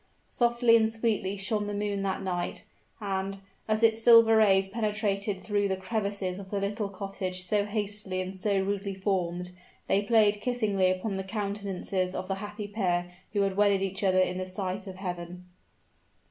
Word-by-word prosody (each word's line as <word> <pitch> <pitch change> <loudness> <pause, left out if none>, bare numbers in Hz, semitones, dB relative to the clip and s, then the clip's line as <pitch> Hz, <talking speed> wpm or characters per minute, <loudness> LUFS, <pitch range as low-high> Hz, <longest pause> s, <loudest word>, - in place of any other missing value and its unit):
Softly 235 -1 +3
and 220 -1 +4
sweetly 220 -4 -1
shone 210 +1 -1
the 205 - -3
moon 205 -1 -1
that 195 0 -2
night; 180 -2 -3 0.3
and, 195 -1 -2 0.3
as 215 +1 0
its 225 0 +4
silver 230 -1 +7
rays 195 -3 +5
penetrated 205 -2 -1
through 205 -1 0
the 190 -1 -1
crevices 200 -2 -2
of 195 -1 -9
the 200 - -1
little 200 +1 -2
cottage 190 -1 -4
so 205 +2 +1
hastily 205 -2 -3
and 185 +1 -4
so 195 +1 +1
rudely 200 0 -2
formed, 180 -2 -1 0.3
they 200 - +2
played 210 -1 +3
kissingly 210 -7 +1
upon 190 +2 -1
the 190 - -3
countenances 195 -2 -2
of 185 - -4
the 195 - -1
happy 210 0 -6
pair 180 -4 -1 0.2
who 205 - +2
had 195 -1 +1
wedded 200 -1 +3
each 195 +1 -3
other 185 -1 +3
in 185 0 +2
the 185 - -3
sight 190 +1 -3
of 190 - -7
Heaven. 180 -1 -6
200 Hz, 175 wpm, -28 LUFS, 190-210 Hz, 0.3 s, silver